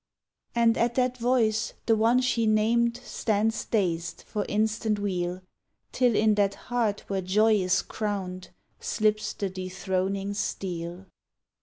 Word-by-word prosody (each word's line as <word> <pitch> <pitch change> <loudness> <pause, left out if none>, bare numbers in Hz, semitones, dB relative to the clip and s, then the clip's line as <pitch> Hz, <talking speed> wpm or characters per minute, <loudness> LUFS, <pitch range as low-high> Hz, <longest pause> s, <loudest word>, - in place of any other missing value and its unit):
And 230 -1 +3
at 235 0 +1
that 255 -1 +1
voice 230 -3 +1
the 225 - +4
one 230 +3 +3
she 240 -3 +1
named 235 +2 +2
Stands 220 0 -1
dazed, 170 -6 -1
for 210 -1 -3
instant 215 0 0
weal, 185 -2 -2 0.5
Till 245 -3 +2
in 215 0 +4
that 200 -1 +1
heart 230 -4 -1
where 195 -1 -1
joy 210 +4 +3
is 185 -1 +1
crowned 190 -4 -4 0.3
Slips 215 -1 0
the 200 - -2
dethroning 190 +1 -2
steel. 180 -2 -4
210 Hz, 130 wpm, -27 LUFS, 190-225 Hz, 0.5 s, the